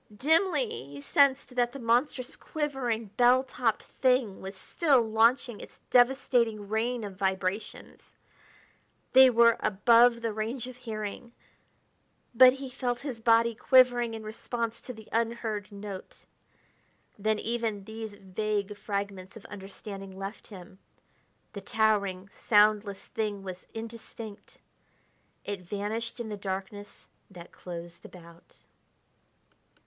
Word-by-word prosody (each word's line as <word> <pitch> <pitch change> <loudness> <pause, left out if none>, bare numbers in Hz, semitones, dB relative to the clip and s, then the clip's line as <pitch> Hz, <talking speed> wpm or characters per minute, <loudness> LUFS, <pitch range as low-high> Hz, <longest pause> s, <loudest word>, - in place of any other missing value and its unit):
Dimly 315 - +2 0.2
he 140 0 -10
sensed 275 - +2
that 240 -1 +2
the - - -6
monstrous, 245 +3 0
quivering, 255 -8 -3
bell 250 +1 +5
topped 245 -4 -1
thing 250 -6 0
was 190 +1 -7
still 280 - +2
launching 230 +1 +2
its - - -12
devastating 245 -4 +3
rain 230 +3 -1
of 200 -2 -6
vibrations; 190 +1 -3 1.0
they 260 0 +9
were 235 -1 +5
above 235 +3 +4
the 225 -2 -1
range 225 +4 -3
of 255 0 -9
hearing; 225 0 -6 1.0
but 255 +2 +8
he 270 0 -7
felt 245 -1 -3
his 265 -5 -5
body 230 0 +4
quivering 245 -1 +4
in 220 - -7
response 230 +1 -4
to - - -7
the 220 -3 -12
unheard 225 -2 -2
note. 200 -1 -9 0.9
Then 215 +1 +1
even 225 -3 -2
these 220 0 -7
vague 205 +1 -3
fragments 200 -1 -5
of 215 - -14
understanding 195 -1 -9
left 195 +2 -7
him. 190 -2 -12 0.7
The 200 - -6
towering, 200 -3 +1
soundless 210 -2 +2
thing 210 -4 -3
was 185 -1 -8
indistinct... 225 -1 -9 0.8
it 200 -2 -4
vanished 210 +6 -4
in 230 -2 -5
the 210 - -5
darkness 195 +1 -6 0.2
that 175 -3 -12
closed 170 -1 -9
about.... 170 -1 -15
220 Hz, 120 wpm, -29 LUFS, 200-240 Hz, 1.0 s, they